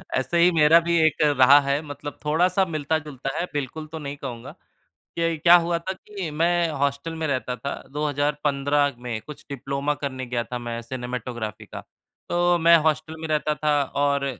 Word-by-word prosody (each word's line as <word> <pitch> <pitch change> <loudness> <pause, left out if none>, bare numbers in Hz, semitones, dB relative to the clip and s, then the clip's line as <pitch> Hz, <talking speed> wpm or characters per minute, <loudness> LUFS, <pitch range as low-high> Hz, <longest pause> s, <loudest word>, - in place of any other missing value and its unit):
ऐसे 130 +6 0
ही 175 +1 +6
मेरा 160 0 +6
भी 170 0 0
एक 155 - +1
रहा 140 -1 +6
है। 140 +1 0
मतलब 145 0 -8
थोड़ा-सा 180 +5 +2
मिलता-जुलता 150 -3 -3
है 175 - 0
बिल्कुल 150 +2 -4
तो 160 - -6
नहीं 140 -1 -6
कहूँगा। 120 -5 -7 0.6
ये 165 -1 +1
क्या 170 +3 +7
हुआ 170 0 0
था 185 +3 -4
कि 195 -2 -7
मैं 170 0 +2
हॉस्टल 140 +3 -1
में - - 0
रहता 130 -3 -2
था। 140 +2 -5 0.2
2015 145 -1 0
में 115 -2 -3
कुछ 150 +6 -12
डिप्लोमा 140 +2 -2
करने 130 -2 -3
गया 120 -1 -2
था 125 - -5
मैं 115 0 -4
सिनेमैटोग्राफी 120 -3 -5
का। - - -9 0.5
तो 175 0 +2
मैं 170 +1 +7
हॉस्टल 155 +1 0
में 160 - -4
रहता 150 0 0
था 150 -1 +1 0.2
और 140 -1 +1
145 Hz, 175 wpm, -24 LUFS, 135-165 Hz, 0.6 s, क्या